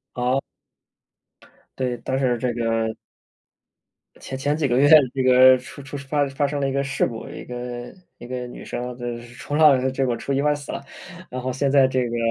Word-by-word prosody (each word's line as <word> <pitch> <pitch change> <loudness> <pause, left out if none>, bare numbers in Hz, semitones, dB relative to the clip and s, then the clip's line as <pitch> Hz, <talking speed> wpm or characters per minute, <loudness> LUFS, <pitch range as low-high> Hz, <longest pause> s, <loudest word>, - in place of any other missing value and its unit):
哦。 125 +2 +1 1.4
对， 125 -2 -1
但 130 - -1
是 130 -2 +1
这 125 +1 -1
个 115 -1 0 1.3
前 135 - -6
前 145 +3 0
几 155 -2 +1
个 120 -2 +1
月， 145 +2 +5 0.3
这 135 - 0
个 130 0 +7
出 130 +3 -11
出 135 +1 -7
发 140 +1 -1
发 135 +1 0
生 140 0 -3
了 135 - 0
一 - - -2
个 140 +1 0
事 140 0 0
故， 115 -1 -7
一 - - -8
个 120 0 -7 0.2
一 120 - -10
个 125 0 -5
女 - - -10
生 125 0 -5
就 120 -1 -6
是 120 +1 -13
冲 145 +4 -4
浪， 135 -4 +5
结 135 +1 0
果 120 -2 0
出 140 - -4
意 135 - +1
外 150 +1 +2
死 145 -1 -7
了。 - - -6 0.5
然 130 - -4
后， 130 +1 -3
现 135 +2 0
在 135 -1 +6
这 130 -2 0
个 120 - -3
130 Hz, 225 characters per minute, -23 LUFS, 125-140 Hz, 1.4 s, 个